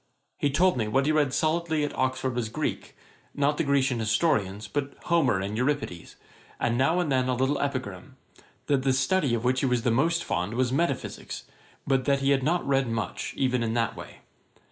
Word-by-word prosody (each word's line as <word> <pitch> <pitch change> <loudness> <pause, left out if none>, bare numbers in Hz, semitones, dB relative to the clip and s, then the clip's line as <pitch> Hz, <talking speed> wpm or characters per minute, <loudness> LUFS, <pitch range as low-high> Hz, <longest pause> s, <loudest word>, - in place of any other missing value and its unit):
He 145 - +2
told 180 +5 +3
me 110 -3 0
what 135 +5 +1
he 155 - +2
read 150 -3 +2
solidly 160 +1 0
at 145 - -3
Oxford 130 0 -1
was 120 -3 -2
Greek; - - -4 0.4
not 145 +1 +1
the - - +1
Grecian 135 -4 +1
historians, 105 - 0
but 140 -1 -3
Homer 160 - +2
and 100 +2 -3
Euripides, 125 - -2 0.4
and 120 - +1
now 140 +8 +2
and 165 -5 0
then 130 -1 +2
a 125 - +1
little 135 +3 0
Epigram; 130 -10 -4 0.5
that 140 -2 +2
the 135 0 +2
study 135 0 +2
of 115 - -3
which 130 +1 +2
he 135 - +1
was 125 -2 +1
the 120 - +2
most 165 +8 +2
fond 95 +6 -2
was 125 0 +1
Metaphysicks, 170 +6 -2 0.4
but 135 -1 +1
he 135 0 +1
had 135 -1 +3
not 165 +5 0
read 135 -2 +2
much, 115 -2 -3
even 125 -2 +1
in 115 0 -1
that 115 -2 0
way. - - -11
130 Hz, 195 wpm, -27 LUFS, 120-145 Hz, 0.5 s, told